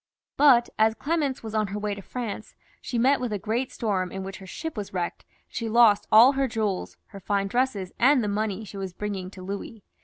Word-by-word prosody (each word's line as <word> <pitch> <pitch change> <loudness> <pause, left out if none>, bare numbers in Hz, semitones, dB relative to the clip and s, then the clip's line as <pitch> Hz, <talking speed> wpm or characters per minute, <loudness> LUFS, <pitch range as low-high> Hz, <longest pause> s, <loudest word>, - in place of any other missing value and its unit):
But 265 -5 +6
as 220 0 +4
Clemence 290 -4 -1
was 220 -1 -6
on 215 -1 +1
her 200 +1 -5
way 210 0 -2
to 200 - -7
France, 235 +1 -6 0.3
she 245 - -4
met 265 +4 +3
with 245 -3 -2
a 210 - -1
great 225 +6 -2
storm, 190 -5 -1
in 190 0 -5
which 195 0 -7
her 190 - -12
ship 320 - -6
was 205 -3 -5
wrecked, 175 -1 -3
and - - -26
she 230 -1 -2
lost 220 -2 +5
all 230 +5 +8
her 270 -1 0
jewels, 215 -5 -2
her 200 - -10
fine 200 +1 0
dresses, 215 -5 -1
and 260 0 +5
the - - -1
money 210 0 -2
she 200 - -10
was 190 -2 -5
bringing 195 -2 -4
to 185 -1 -11
Louis. 200 +2 -6
215 Hz, 225 wpm, -26 LUFS, 195-240 Hz, 0.3 s, all